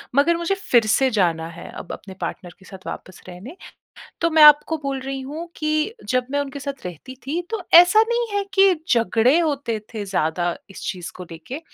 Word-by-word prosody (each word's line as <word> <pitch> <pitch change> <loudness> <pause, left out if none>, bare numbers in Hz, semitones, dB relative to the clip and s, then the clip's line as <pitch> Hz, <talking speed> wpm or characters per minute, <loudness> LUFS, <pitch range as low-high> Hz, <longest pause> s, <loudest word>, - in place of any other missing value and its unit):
मगर 335 +4 +3
मुझे 340 +3 -1
फिर 240 - +2
से 265 +3 +3
जाना 165 -3 +1
है 170 0 -10
अब - - -9
अपने 190 -1 -10
पार्टनर 175 -1 -6
के 185 - -19
साथ 190 -1 -12
वापस 185 - -8
रहने। 190 - -10 0.7
तो 335 -1 +2
मैं 315 -1 +5
आपको 300 +2 +7
बोल 275 -1 -3
रही 270 0 -5
हूँ 300 +6 -7
कि 305 +7 -1
जब 255 -1 0
मैं 285 0 0
उनके 280 0 -5
साथ 275 -3 -7
रहती 180 - -9
थी 325 +5 -1
तो 445 -3 -3
ऐसा 355 +6 +8
नहीं 475 0 0
है 400 - 0
कि 390 -1 +5
झगड़े 235 +5 +3
होते 285 -9 -1 0.2
थे 210 -2 -4
ज़्यादा 175 -2 -1
इस - - -11
चीज़ 180 -2 -5
को 180 - -8
लेके, 165 - -8
270 Hz, 200 wpm, -22 LUFS, 190-320 Hz, 0.7 s, ऐसा